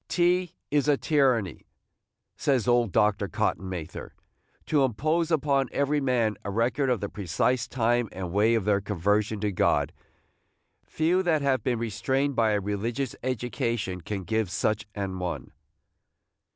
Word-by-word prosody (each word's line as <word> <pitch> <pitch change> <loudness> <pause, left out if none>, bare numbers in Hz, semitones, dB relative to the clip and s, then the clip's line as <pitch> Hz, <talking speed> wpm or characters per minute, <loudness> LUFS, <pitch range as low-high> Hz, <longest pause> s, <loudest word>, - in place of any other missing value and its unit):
"'T 180 0 +1 0.2
is 145 -1 +2
a 145 -2 +4
tyranny," 125 - +1 0.7
says 130 -5 +1
old 120 -4 +3
Dr. 105 0 +2
Cotton 95 +2 -1
Mather, 90 -2 -7 0.5
"to 145 -3 +2
impose 155 +7 0
upon 140 -4 +1
every 145 +1 +1
man 120 -5 +1
a - - -4
record 120 +6 +1
of 125 -4 +1
the 100 - -2
precise 110 +6 -1
time 120 -2 +1
and 90 -2 -5
way 110 +3 +3
of 110 -4 0
their 100 -1 +2
conversion 105 +2 0
to 105 -1 0
God. 90 - +1 0.9
Few 170 +4 +1
that 160 -5 +1
have 130 -5 +1
been 125 -2 0
restrained 125 +5 -1
by 110 -2 +3
a 105 - +2
religious 110 +6 -3
education 115 -6 -2
can 95 +3 -4
give 110 +2 -1
such 105 +1 -1
an 95 -2 -3
one." 85 -6 -4
115 Hz, 150 wpm, -27 LUFS, 100-135 Hz, 0.9 s, a